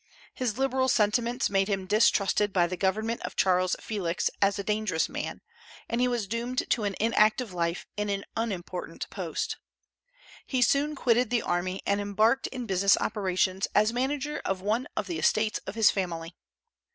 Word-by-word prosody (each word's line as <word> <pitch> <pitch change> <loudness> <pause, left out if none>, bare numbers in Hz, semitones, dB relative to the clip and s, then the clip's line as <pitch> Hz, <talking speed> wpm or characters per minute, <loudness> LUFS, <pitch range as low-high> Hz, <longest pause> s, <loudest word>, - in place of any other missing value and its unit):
His 245 -4 -2
liberal 265 -1 +1
sentiments 235 +2 +2
made 195 -1 +1
him 195 -2 -1
distrusted 205 0 +3
by 180 -2 +3
the 180 +1 -3
government 215 +5 -1
of - - -6
Charles 185 -1 +2
Felix 185 -6 -2
as 200 0 +3
a 200 - -3
dangerous 210 -5 0
man, - - -5 0.5
and 235 +1 -1
he 250 - +4
was 240 -4 -1
doomed 235 +4 -2
to 220 - +2
an 200 -1 -1
inactive 220 0 +2
life 170 0 -2
in 210 0 -2
an 200 0 -2
unimportant 185 -5 -4
post. - - -3 0.9
He 255 -2 +2
soon 285 +5 +2
quitted 245 -3 +2
the 240 -2 +1
army, 185 +2 -2
and 200 0 +1
embarked 215 +6 +2
in 250 -2 -6
business 195 -1 +3
operations 190 -2 0
as 215 +2 +4
manager 280 +4 -2
of 195 -1 -1
one 215 +6 -1
of - - 0
the 170 -4 -4
estates 215 +6 +2
of - - -5
his 225 -2 +5
family. 170 -3 -3
210 Hz, 170 wpm, -28 LUFS, 190-235 Hz, 0.9 s, his